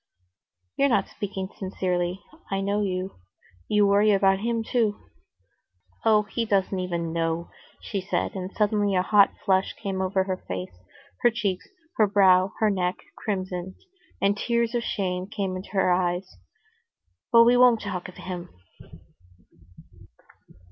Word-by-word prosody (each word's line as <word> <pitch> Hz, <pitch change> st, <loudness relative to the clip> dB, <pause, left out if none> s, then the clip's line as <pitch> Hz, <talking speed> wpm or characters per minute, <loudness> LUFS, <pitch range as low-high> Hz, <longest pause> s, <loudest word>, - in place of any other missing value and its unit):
"You're 280 Hz, -, +3 dB
not 200 Hz, -6 st, +1 dB
speaking 190 Hz, -2 st, -5 dB
sincerely. 180 Hz, -1 st, -2 dB, 0.3 s
I 195 Hz, -, -1 dB
know 200 Hz, +2 st, 0 dB
you. 185 Hz, -, -3 dB, 0.5 s
You 210 Hz, -1 st, +3 dB
worry 205 Hz, +1 st, +4 dB
about 195 Hz, -1 st, +3 dB
him 230 Hz, +1 st, -1 dB
too." 220 Hz, -3 st, 0 dB, 1.0 s
"Oh, 215 Hz, -2 st, +4 dB
he 220 Hz, +3 st, -3 dB
doesn't 195 Hz, -3 st, 0 dB
even 170 Hz, -2 st, -3 dB
know," 165 Hz, 0 st, -2 dB, 0.3 s
she 200 Hz, -3 st, -3 dB
said, 195 Hz, -, -2 dB
and 185 Hz, 0 st, -5 dB
suddenly 205 Hz, -2 st, +1 dB
a 180 Hz, -, +2 dB
hot 200 Hz, 0 st, +5 dB, 0.2 s
flush 190 Hz, -1 st, +2 dB
came 195 Hz, -3 st, -4 dB
over 190 Hz, 0 st, +1 dB
her 185 Hz, -1 st, -3 dB
face; 90 Hz, 0 st, -5 dB, 0.5 s
her 240 Hz, -, +6 dB
cheeks, 200 Hz, -5 st, -2 dB, 0.3 s
her 215 Hz, -, +5 dB
brow, 190 Hz, -2 st, +4 dB
her 215 Hz, -1 st, +2 dB
neck 180 Hz, -2 st, 0 dB, 0.2 s
crimsoned, 185 Hz, -2 st, -4 dB, 0.4 s
and 200 Hz, +1 st, +2 dB
tears 235 Hz, +2 st, 0 dB
of 240 Hz, -, 0 dB
shame 185 Hz, -4 st, -2 dB
came 195 Hz, -3 st, -3 dB
into 185 Hz, +1 st, -7 dB
her 190 Hz, -2 st, +2 dB
eyes. 180 Hz, -, -1 dB, 1.0 s
"But 230 Hz, -1 st, +8 dB
we 240 Hz, +1 st, +5 dB
won't 245 Hz, -2 st, +5 dB
talk 195 Hz, -3 st, -4 dB
of 180 Hz, -, -14 dB
him." 180 Hz, -1 st, -7 dB
195 Hz, 140 wpm, -25 LUFS, 185-210 Hz, 1.0 s, But